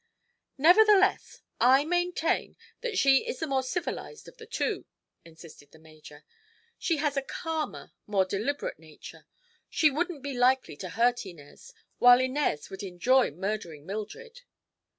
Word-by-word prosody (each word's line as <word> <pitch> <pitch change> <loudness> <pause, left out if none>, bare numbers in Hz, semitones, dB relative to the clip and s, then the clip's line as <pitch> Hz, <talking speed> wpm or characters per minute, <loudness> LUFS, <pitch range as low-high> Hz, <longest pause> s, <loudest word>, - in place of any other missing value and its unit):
"Nevertheless, 390 +6 +4 0.2
I 265 +3 +5
maintain 350 -1 -1 0.2
that 460 -5 -3
she 275 -4 +5
is 475 - -3
the 320 - -3
more 270 -3 0
civilized 355 - -5
of - - -14
the 450 - -12
two," 465 - -2 0.4
insisted 160 -3 -15
the - - -17
major. 155 -2 -16 0.5
"She 335 -4 0
has 290 -1 -1
a - - +2
calmer, 320 +3 -5 0.2
more 195 -2 +2
deliberate 210 - -3
nature. 155 -1 -14 0.4
She 305 -2 +3
wouldn't 320 0 -3
be 285 -1 -4
likely 250 - +2
to 185 - -7
hurt 240 +6 +1
Inez, 175 - -14 0.2
while 245 0 +7
Inez 260 - -1
would 190 - -7
enjoy 225 +8 +2
murdering 170 -3 -5
Mildred." 455 - -7
260 Hz, 140 wpm, -28 LUFS, -, 0.5 s, while